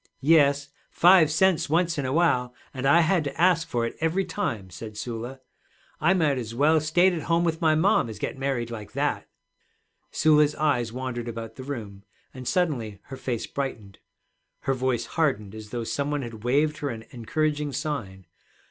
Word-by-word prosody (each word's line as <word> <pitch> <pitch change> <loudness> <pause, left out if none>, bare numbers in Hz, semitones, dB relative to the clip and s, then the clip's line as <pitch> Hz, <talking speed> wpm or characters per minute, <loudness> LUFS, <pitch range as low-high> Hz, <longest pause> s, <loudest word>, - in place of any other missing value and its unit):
'Yes; 140 -1 +4 0.2
five 175 -3 +6
cents 170 0 +2
once 170 0 +1
in 135 - -1
a - - -2
while, 125 -6 +1 0.2
and 135 0 -2
I 165 +5 +6
had 170 0 +2
to 140 -1 -5
ask 175 -2 +3
for 120 -1 -1
it 115 - -5
every 165 +4 0
time,' 110 - -3
said 105 +5 -9
Sula. 120 +3 -6 0.6
'I 175 +5 +3
might 155 -6 +2
as 115 -1 -6
well 155 +4 +4
stayed 175 +5 +3
at 165 - -3
home 165 +3 +1
with 165 -1 -1
my 160 -1 +4
mom 170 - +3
as 110 - -7
get - - -4
married 135 -3 -2
like 110 -3 -8
that.' - - -1 0.8
Sula's 150 -1 +3
eyes 125 -7 +1
wandered 125 -1 -4
about 115 -1 -6
the 130 - -9
room, 110 -8 -7 0.3
and 130 -1 -8
suddenly 125 - -1
her 135 - -6
face 125 -3 -3
brightened. 115 -8 -5 0.6
Her 135 - 0
voice 130 -2 -1
hardened 130 -11 -1
as 110 -1 -9
though 120 0 -3
some 140 +5 -2
one 145 -2 -1
had 115 -3 -8
waved 150 +5 +1
her 145 - -2
an 115 -3 -6
encouraging 150 +4 -1
sign. 105 - -4
140 Hz, 185 wpm, -26 LUFS, 120-155 Hz, 0.8 s, five